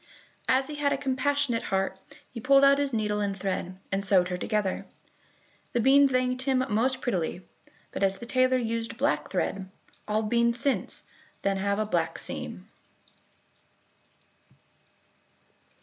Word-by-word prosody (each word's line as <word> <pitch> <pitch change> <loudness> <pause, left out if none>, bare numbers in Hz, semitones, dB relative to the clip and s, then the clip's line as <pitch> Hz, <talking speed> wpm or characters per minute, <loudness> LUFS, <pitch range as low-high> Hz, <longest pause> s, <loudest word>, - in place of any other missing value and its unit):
As 260 +1 +3
he 300 - -6
had 285 -1 +1
a 280 - +1
compassionate 270 -2 0
heart 190 0 -1 0.3
he 235 - -7
pulled 275 +4 +5
out 280 0 +5
his 285 -1 0
needle 210 -2 0
and 200 -1 -1
thread, 185 -1 -3
and 195 +1 0
sewed 185 -3 +3
her 180 - -2
together. 210 0 -1 0.9
The 240 - +1
bean 275 +4 +6
thanked 255 0 0
him 260 -1 +1
most 250 +5 +1
prettily, 180 -5 -2 0.5
but - - -5
as 195 0 +2
the 235 - -8
tailor 255 +1 +3
used 230 -1 -2
black - - 0
thread, 195 -1 -2 0.4
all 215 +1 +1
beans 235 +2 +2
since 275 +1 -1 0.4
then 195 0 +1
have 200 +1 0
a 215 - 0
black 210 - -1
seam. - - -6
230 Hz, 145 wpm, -27 LUFS, 200-260 Hz, 0.9 s, bean